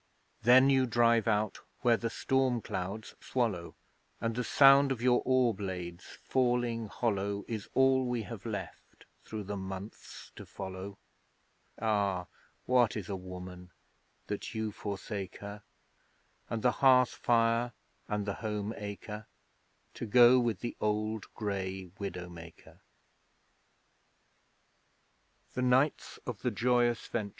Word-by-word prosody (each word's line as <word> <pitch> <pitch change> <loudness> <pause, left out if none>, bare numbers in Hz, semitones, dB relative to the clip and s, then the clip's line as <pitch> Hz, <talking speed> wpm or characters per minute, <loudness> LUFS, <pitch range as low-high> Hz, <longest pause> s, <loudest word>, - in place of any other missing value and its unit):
Then 130 +3 +7
you 130 -1 +3
drive 115 -2 +3
out 105 -1 +1 0.2
where 120 -2 +5
the 115 0 -2
storm 130 +1 +1
clouds 100 +1 -5
swallow: 110 -9 -2 0.4
And 115 0 -1
the 125 - -1
sound 135 +1 +6
of 130 - -1
your 125 0 +3
oar 130 -2 +3
blades 90 -3 -6
falling 120 -3 +1
hollow 100 -2 -1
Is 110 -3 -5
all 130 -1 +4
we 120 -2 -1
have 100 - -8
left - - -7 0.2
through 110 -1 -6
the 100 +1 -4
months 95 +2 -8
to - - -7
follow. 95 +1 -7 0.8
Ah, 100 -4 +1 0.4
what 125 -3 +3
is 105 -1 -6
a 100 - -2
Woman 90 -1 -9 0.6
that 105 +2 -5
you 110 -1 -2
forsake 100 -1 -5
her, 100 +1 -8 0.9
And 115 -2 -3
the 125 - +5
hearth 130 -2 +6
fire 115 0 +2 0.4
and 105 -1 -2
the 100 - -1
home 105 -1 -2
acre, 105 +1 -7 0.7
To 120 - -6
go 125 +3 +7
with 115 -5 -1
the 120 - -4
old 105 0 -1
grey 95 -3 -3
Widow 90 -3 -5
maker? 85 -1 -13
110 Hz, 115 wpm, -31 LUFS, 100-120 Hz, 0.9 s, Then